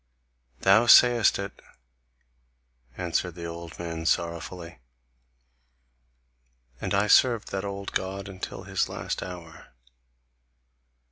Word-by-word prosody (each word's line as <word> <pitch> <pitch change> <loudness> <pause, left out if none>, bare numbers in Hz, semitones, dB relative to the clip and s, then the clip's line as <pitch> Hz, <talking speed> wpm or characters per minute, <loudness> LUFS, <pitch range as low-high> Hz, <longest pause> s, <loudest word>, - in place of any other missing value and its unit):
"Thou 110 +5 +5
sayest 120 -1 +6
it," 100 0 -7 1.4
answered 90 -1 -2
the 85 -1 -7
old 85 0 -8
man 85 -1 -5
sorrowfully. 85 -2 -3 2.0
"And - - -1
I 100 +1 +3
served 115 +1 +3
that 95 0 -3
old 100 0 -5
God 95 +1 -3
until 95 -2 -7
his - - -1
last - - -4
hour. 85 -3 -10
95 Hz, 95 wpm, -26 LUFS, 85-100 Hz, 2.0 s, sayest